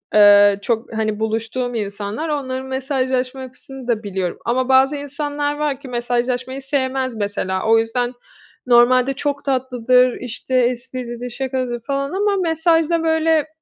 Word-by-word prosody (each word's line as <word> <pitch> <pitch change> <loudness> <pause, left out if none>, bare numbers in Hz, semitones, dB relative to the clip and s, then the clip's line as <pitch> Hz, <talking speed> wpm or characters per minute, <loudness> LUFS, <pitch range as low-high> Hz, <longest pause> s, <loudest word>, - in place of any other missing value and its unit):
eee, 205 -1 +7
çok, 230 -1 -2
hani, 215 -1 -1
buluştuğum 225 +3 -2
insanlar. 210 +7 -4
Onların 260 -3 -3
mesajlaşma 260 -1 -1
yapısını 260 0 -10
da 230 -2 0
biliyorum. 190 -3 -3
Ama 255 +2 0
bazı 265 +2 +5
insanlar 290 0 -3
var 295 -3 -1
ki 280 - -11
mesajlaşmayı 245 +2 -2
sevmez 265 -2 -1
mesela, 200 -2 -2
o 225 0 +5
yüzden 240 +2 -1 0.5
normalde 250 +2 +5
çok 280 +1 -3
tatlıdır, 255 -2 +2
işte, 250 +1 -4
esprilidir, 245 0 -1
şakacıdır 255 -1 -3
falan 275 0 -1
ama 400 +2 +1
mesajda, 330 0 +2
böyle, 320 -1 +2
255 Hz, 130 wpm, -20 LUFS, 235-275 Hz, 0.5 s, eee